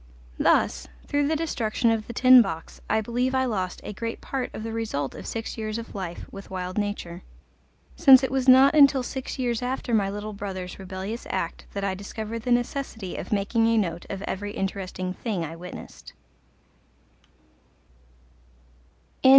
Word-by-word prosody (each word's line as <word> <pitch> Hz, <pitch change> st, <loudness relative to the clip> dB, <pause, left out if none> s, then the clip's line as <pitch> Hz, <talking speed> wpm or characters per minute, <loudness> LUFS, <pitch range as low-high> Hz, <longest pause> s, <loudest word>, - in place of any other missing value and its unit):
Thus, -, -, +2 dB, 0.2 s
through 285 Hz, 0 st, +1 dB
the 315 Hz, -, +1 dB
destruction 240 Hz, -7 st, 0 dB
of 220 Hz, -1 st, -1 dB
the 235 Hz, -, -6 dB
Tin 255 Hz, 0 st, +8 dB
Box, 165 Hz, -7 st, -5 dB
I 220 Hz, -, +3 dB
believe 245 Hz, +4 st, 0 dB
I 260 Hz, 0 st, +3 dB
lost 190 Hz, -7 st, -2 dB
a -, -, -6 dB
great 230 Hz, +3 st, -4 dB
part 265 Hz, -2 st, -3 dB
of 220 Hz, -, -7 dB
the 225 Hz, -, -4 dB
result 210 Hz, -12 st, -2 dB
of -, -, -8 dB
six 225 Hz, 0 st, -4 dB
years 215 Hz, 0 st, -2 dB
of 230 Hz, 0 st, -7 dB
life 185 Hz, -4 st, -5 dB
with 195 Hz, 0 st, -10 dB
wild 185 Hz, +1 st, -3 dB
nature, 195 Hz, -4 st, -3 dB, 0.7 s
since 270 Hz, -5 st, +8 dB
it 265 Hz, -, 0 dB
was 265 Hz, -1 st, +2 dB
not 265 Hz, +3 st, +8 dB
until 280 Hz, -3 st, +6 dB
six 265 Hz, +2 st, -5 dB
years 245 Hz, -3 st, 0 dB
after 250 Hz, -1 st, -2 dB
my 200 Hz, -3 st, +3 dB
little 205 Hz, +1 st, -5 dB
brother's 190 Hz, -2 st, -6 dB
rebellious 190 Hz, +4 st, -5 dB
act 175 Hz, -3 st, -3 dB
that 200 Hz, -, -3 dB
I 195 Hz, -1 st, 0 dB
discovered 215 Hz, +3 st, -5 dB
the 245 Hz, +2 st, -2 dB
necessity 240 Hz, -5 st, -1 dB
of -, -, -6 dB
making 215 Hz, +3 st, +2 dB
a 230 Hz, 0 st, +3 dB
note 170 Hz, -5 st, -1 dB
of 195 Hz, 0 st, -5 dB
every 205 Hz, +1 st, -4 dB
interesting 185 Hz, -1 st, -3 dB
thing 200 Hz, -4 st, -3 dB
I 160 Hz, +1 st, -7 dB
witnessed. 180 Hz, +2 st, -10 dB
215 Hz, 165 wpm, -26 LUFS, 190-250 Hz, 0.7 s, Tin